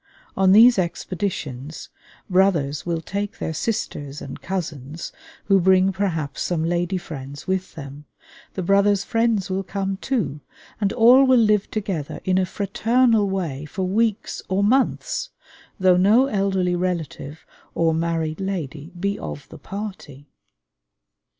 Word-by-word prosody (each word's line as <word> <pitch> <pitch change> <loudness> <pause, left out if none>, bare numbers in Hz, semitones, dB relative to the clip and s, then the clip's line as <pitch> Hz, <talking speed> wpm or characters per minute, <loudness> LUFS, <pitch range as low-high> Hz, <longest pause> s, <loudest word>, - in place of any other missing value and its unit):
On 190 -1 +4
these 230 +2 +7
expeditions 165 -5 -4 0.4
brothers 175 -7 +1
will 165 -1 -1
take 200 +4 -4
their 160 - -3
sisters 150 -7 -3
and 135 - -8
cousins, 160 -5 -5 0.3
who 195 -1 +4
bring 190 +1 +4
perhaps 165 -7 -2
some 170 -3 -1
lady 175 +2 0
friends 145 -5 -8
with 190 0 -2
them; 145 -1 -9 0.5
the 185 - -2
brothers' 200 +2 +3
friends 225 -4 0
will 190 +1 0
come 195 0 -3
too; 195 - -2 0.4
and 200 -2 +1
all 250 +3 +6
will 260 -1 +5
live 210 -3 +3
together 195 -9 -3
in 185 0 +2
a 185 - 0
fraternal 220 +2 +2
way 165 -8 -3
for 185 +5 -4
weeks 215 +3 0
or 190 +2 +1
months, 270 - +1 0.5
though 185 -1 +5
no 210 +8 +5
elderly 195 -6 0
relative 165 -4 -4 0.3
or 165 -1 +2
married 160 -1 -1
lady 160 -6 -4
be 200 +2 -1
of 145 - -7
the 160 - -11
party. 170 -7 -8
185 Hz, 135 wpm, -22 LUFS, 160-200 Hz, 0.5 s, these